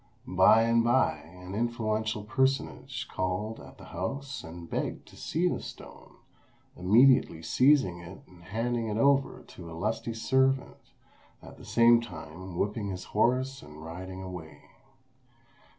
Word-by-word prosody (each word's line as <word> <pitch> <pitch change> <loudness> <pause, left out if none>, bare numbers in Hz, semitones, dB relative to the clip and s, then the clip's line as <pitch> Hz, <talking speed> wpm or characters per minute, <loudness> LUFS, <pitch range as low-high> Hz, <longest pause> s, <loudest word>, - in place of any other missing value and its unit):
By 95 +5 +5
and 115 0 +3
by 120 -9 +3
an 90 +5 -11
influential 110 -1 -1
personage 130 +4 -1
called 95 +4 -3
at - - -13
the - - -12
house 135 +10 -5
and 85 +1 -9
begged - - -3
to - - -16
see 170 +3 -1
the - - -1
stone, - - -11 0.6
immediately 110 -2 +4
seizing 125 - +3
it 85 +2 -11
and 90 -1 -18
handing 115 +3 -2
it 105 0 -2
over 140 +2 +2
to 85 -2 -11
a 80 - -8
lusty 110 +4 -2
servant, 130 +3 0 0.5
at - - -12
the - - -13
same 115 0 +5
time 85 -2 -9
whipping 105 +2 -1
his 90 -1 -5
horse 130 +5 +1
and 75 +1 -12
riding 95 +3 -7
away. 80 -5 -9
105 Hz, 140 wpm, -29 LUFS, 90-120 Hz, 0.6 s, By